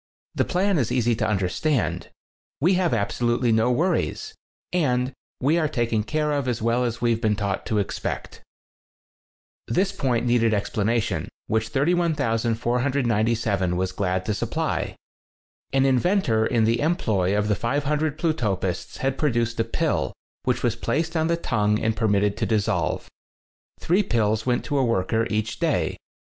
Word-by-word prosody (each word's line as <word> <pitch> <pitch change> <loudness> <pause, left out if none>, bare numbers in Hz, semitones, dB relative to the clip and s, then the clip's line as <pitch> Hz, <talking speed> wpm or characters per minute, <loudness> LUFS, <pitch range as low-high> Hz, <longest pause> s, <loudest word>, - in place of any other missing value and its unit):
The - - +1
plan 190 -1 +1
is 120 - 0
easy 120 -1 +2
to 110 -2 0
understand. 105 +8 0 0.5
We 175 +7 +3
have 180 -2 +2
absolutely 120 +2 +1
no 110 +2 +3
worries, 185 - 0 0.4
and 130 -6 +1 0.3
we 150 +6 +2
are 155 - +2
taken 115 -5 0
care 150 +6 -1
of 140 -3 -1
as 120 -3 -1
well 115 +2 +1
as 120 0 -3
we've 115 -1 +1
been 105 -1 +2
taught 100 -2 -2
to 110 - 0
expect." 100 - -3 1.3
This 190 - +1
point 125 -10 0
needed 115 -2 +3
explanation, 110 +2 -1 0.2
which 110 0 0
31497 120 - +1
was 95 0 -1
glad 95 -1 -1
to 105 - 0
supply. 100 - -2 0.8
An 135 0 +3
inventor 130 - +2
in 115 -3 +2
the 115 +2 +2
employ 110 - +1
of 105 0 +1
the 105 - +2
500 145 +6 -1
Plutopists 105 - -1
had 135 0 -1
produced 115 -6 0
a - - +4
pill, 115 - -1 0.3
which 125 -2 0
was 120 -2 +1
placed 160 +8 -1
on 160 0 +2
the 170 0 +1
tongue 105 -8 +1
and 110 0 0
per 110 0 0
mitted 100 0 +2
to - - -1
dissolve. 110 -3 0 0.7
Three 180 +5 +2
pills 110 - 0
went 125 -1 +1
to 145 -2 0
a - - +3
worker 115 0 +1
each 110 0 -2
day. - - 0
120 Hz, 155 wpm, -24 LUFS, 110-145 Hz, 1.3 s, a